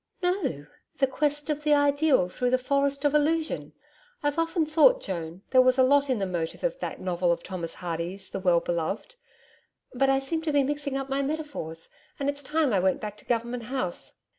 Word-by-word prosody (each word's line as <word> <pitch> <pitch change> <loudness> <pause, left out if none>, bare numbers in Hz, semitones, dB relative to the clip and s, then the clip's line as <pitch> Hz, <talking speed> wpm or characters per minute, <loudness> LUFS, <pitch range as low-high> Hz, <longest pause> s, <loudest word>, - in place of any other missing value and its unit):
'No, 355 - -1 0.3
The 270 - +4
Quest 295 +2 -1
of 300 0 -2
the 300 0 +4
Ideal 285 - +3
through 245 +7 -1
the 255 - +3
Forest 280 +2 0
of 290 - +3
Illusion. 310 +2 0 0.5
I've 290 +2 0
often 330 0 +1
thought, 325 +12 +5
Joan, 170 0 -5
there 255 - +7
was 255 0 +4
a 260 - +6
lot 280 +2 +4
in 255 - +2
the 195 - -1
motive 170 -3 -4
of - - -1
that - - -4
novel 180 -1 0
of 170 - -1
Thomas 170 -3 -5
Hardy's 175 +3 -5
THE - - -3
WELL 175 -2 +3
BELOVED. 175 - -3 0.8
But 270 +2 +2
I 270 - +4
seem 295 +4 -2
to 320 -1 -1
be 285 -1 +3
mixing 285 0 -2
up 270 0 -3
my 275 +1 0
metaphor, 290 - -4 0.4
and 280 0 0
it's 285 0 -3
time 295 -2 +1
I 195 - +3
went 190 +1 +2
back 210 -1 -5
to - - -16
Government 235 0 -2
House.' 250 -8 -4
270 Hz, 205 wpm, -27 LUFS, 190-295 Hz, 0.8 s, there